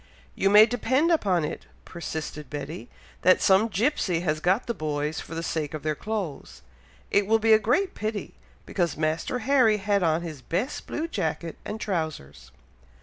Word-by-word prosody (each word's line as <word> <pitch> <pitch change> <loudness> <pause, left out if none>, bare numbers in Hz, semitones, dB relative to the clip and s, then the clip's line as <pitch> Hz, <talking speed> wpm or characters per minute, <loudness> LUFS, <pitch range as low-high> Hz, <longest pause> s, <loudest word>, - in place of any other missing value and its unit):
"You 195 - +1
may 210 +2 +9
depend 260 +7 +1
upon 190 - +2
it," - - -6 0.2
persisted 155 -2 -6
Betty, 145 -5 -6 0.3
"that 185 +1 +5
some 195 +3 +4
gipsey 205 - 0
has 155 -3 0
got 185 +8 +1
the 235 - -2
boys 150 -3 -2
for 165 - -8
the 165 - -3
sake 155 -2 -2
of 155 - -7
their 155 0 0
clothes. 185 - -5 0.5
It 200 -1 +3
will 225 +1 +4
be 225 0 +4
a 215 - +7
great 365 - +1
pity, 215 -1 -4 0.3
because 175 -4 -1
Master 155 +9 -1
Harry 250 -6 +4
had 200 0 +1
on 165 -1 +1
his 155 -5 -7
best 185 - -3
blue 320 +2 -3
jacket 170 - -3
and 215 - -5
trowsers." 160 - -4
185 Hz, 170 wpm, -26 LUFS, 155-220 Hz, 0.5 s, may